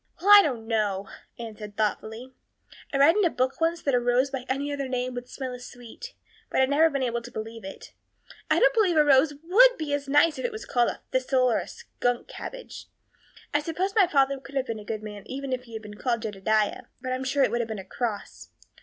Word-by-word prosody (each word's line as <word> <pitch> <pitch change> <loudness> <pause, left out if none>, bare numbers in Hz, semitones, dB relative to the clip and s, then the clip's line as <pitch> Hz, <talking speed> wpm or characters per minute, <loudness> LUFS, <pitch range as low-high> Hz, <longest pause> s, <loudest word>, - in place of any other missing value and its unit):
"Well, 395 +4 +3
I 410 - +11
don't 245 - -3
know." 205 -4 -1 0.3
Anne 225 -3 -8
looked 210 -1 -9
thoughtful. 220 +4 -2 0.6
"I 275 - 0
read 295 +7 +5
in 420 - +3
a 345 - +4
book 260 +1 -2
once 330 +1 0
that 280 - 0
a 245 - +4
rose 245 +3 +1
by 255 -2 -4
any 280 +2 -1
other 280 -1 -3
name 255 0 -2
would 245 0 -7
smell 260 -2 -5
as 250 0 -9
sweet, 245 - -11 0.3
but - - 0
I've 265 0 +3
never 310 +3 +4
been 275 -3 -2
able 235 -1 -1
to 240 - -10
believe 225 0 -7
it. 195 - -10 0.6
I - - +4
don't - - +5
believe 400 -8 +2
a 300 - +6
rose 290 +1 +4
would - - +6
be 300 -2 -3
as 285 -1 -2
nice 295 +3 +4
if - - -3
it 485 - -1
was 435 0 -7
called 240 -2 +2
a - - -7
thistle 255 -1 +2
or - - +2
a - - -6
skunk 245 0 -3
cabbage. - - -9 0.7
I 290 - +3
suppose 350 +5 -2
my 400 -4 +5
father 275 -4 +2
could 275 +1 -13
have 265 -1 0
been 230 -3 -4
a - - -10
good 215 +1 -5
man 210 -1 -7
even 270 0 -4
if 250 0 -4
he 230 - -14
had 220 0 -6
been 210 0 -11
called 235 -3 -1
Jedediah; 215 0 0
but 255 -1 -3
I'm 255 +1 -3
sure 270 +1 +1
it - - +2
would 240 - 0
have 230 - -3
been 220 - -4
a 190 - -8
cross. 215 +1 -5
255 Hz, 245 wpm, -26 LUFS, 230-290 Hz, 0.7 s, I